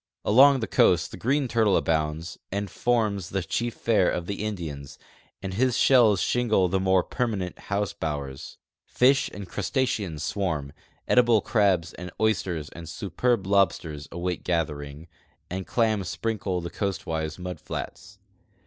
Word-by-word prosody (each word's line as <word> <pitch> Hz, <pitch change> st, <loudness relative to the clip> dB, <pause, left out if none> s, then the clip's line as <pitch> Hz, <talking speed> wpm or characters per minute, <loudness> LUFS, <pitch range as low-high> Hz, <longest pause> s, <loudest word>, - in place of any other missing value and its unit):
Along 135 Hz, +5 st, +6 dB
the 110 Hz, -, -2 dB
coast 85 Hz, -2 st, +3 dB
the -, -, -7 dB
green 135 Hz, +3 st, +1 dB
turtle 110 Hz, -4 st, +3 dB
abounds 80 Hz, +1 st, -1 dB
and 100 Hz, +1 st, -3 dB
forms 110 Hz, -6 st, 0 dB
the 95 Hz, -1 st, -2 dB
chief 120 Hz, +7 st, -2 dB
fare 105 Hz, -6 st, +2 dB
of 85 Hz, -, -2 dB
the 100 Hz, +2 st, -4 dB
Indians, 75 Hz, -9 st, -5 dB, 0.5 s
and 95 Hz, -1 st, -4 dB
his 125 Hz, +4 st, +1 dB
shells 115 Hz, -7 st, +5 dB
shingle 115 Hz, -6 st, +2 dB
the 95 Hz, +2 st, 0 dB
more 95 Hz, -1 st, +3 dB
perma 120 Hz, -4 st, -2 dB
nent 90 Hz, -2 st, -5 dB
house 100 Hz, 0 st, -1 dB
bowers. 70 Hz, -4 st, -5 dB, 0.3 s
Fish 135 Hz, +2 st, +3 dB
and 100 Hz, -2 st, -8 dB
crustaceans 100 Hz, -, -2 dB
swarm, 80 Hz, -9 st, -2 dB, 0.3 s
edible 120 Hz, -3 st, +5 dB
crabs 95 Hz, -7 st, +1 dB
and 90 Hz, 0 st, -8 dB
oysters 90 Hz, -8 st, 0 dB
and 85 Hz, -1 st, -10 dB
superb 100 Hz, +5 st, -1 dB
lobsters 90 Hz, -7 st, +1 dB
await 90 Hz, +1 st, -3 dB
gathering, 75 Hz, -2 st, -3 dB, 0.4 s
and 95 Hz, +1 st, -4 dB
clams 110 Hz, -5 st, +1 dB
sprinkle 100 Hz, -1 st, -2 dB
the 85 Hz, -, -6 dB
coastwise 80 Hz, -6 st, -3 dB
mud 90 Hz, 0 st, -6 dB
flats. -, -, -7 dB
95 Hz, 145 wpm, -26 LUFS, 85-110 Hz, 0.5 s, Along